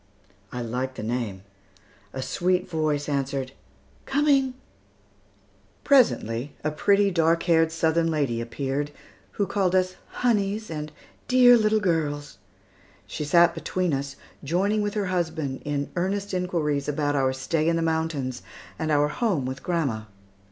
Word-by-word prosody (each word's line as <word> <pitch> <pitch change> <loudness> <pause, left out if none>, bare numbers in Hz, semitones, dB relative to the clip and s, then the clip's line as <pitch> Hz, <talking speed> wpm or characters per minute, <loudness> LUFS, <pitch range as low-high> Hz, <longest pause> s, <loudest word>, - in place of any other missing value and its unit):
I 125 -1 -4
liked 125 +3 -3
the - - -6
name. 110 -5 -3 0.7
A 130 - -4
sweet 180 +6 0
voice 155 -3 -1
answered, 135 -2 -2 0.6
"Coming!" 275 -2 +2 1.3
Presently, 145 - +2
a 150 - 0
pretty 200 +6 +3
dark 165 0 +2
eyed 165 -1 +4
Southern 165 0 +1
lady 140 -7 0
appeared, 135 +4 -3 0.4
who 200 - 0
called 190 -2 0
us 185 0 +1 0.3
"honeys," 210 -3 +1
and 150 -1 -5 0.4
"dear 250 -1 +7
little 215 -1 +3
girls." 145 - -1 0.7
She - - -5
sat 170 +3 +5
between 180 -4 -1
us, 135 0 -3 0.3
joining 195 +8 +1
with 205 0 -2
her 205 -2 0
husband 160 -7 -2
in 145 -1 -2
earnest 195 +3 -1
inquiries 165 -6 -1
about 145 0 0
our 135 -2 +2
stay 155 +5 0
in 170 - +2
the 165 - 0
mountains 160 -6 -1 0.4
and 160 - -1
our 145 -1 +3
home 180 - -1
with 130 +1 -5
grandma. 140 -11 -1
160 Hz, 135 wpm, -25 LUFS, 140-185 Hz, 1.3 s, dear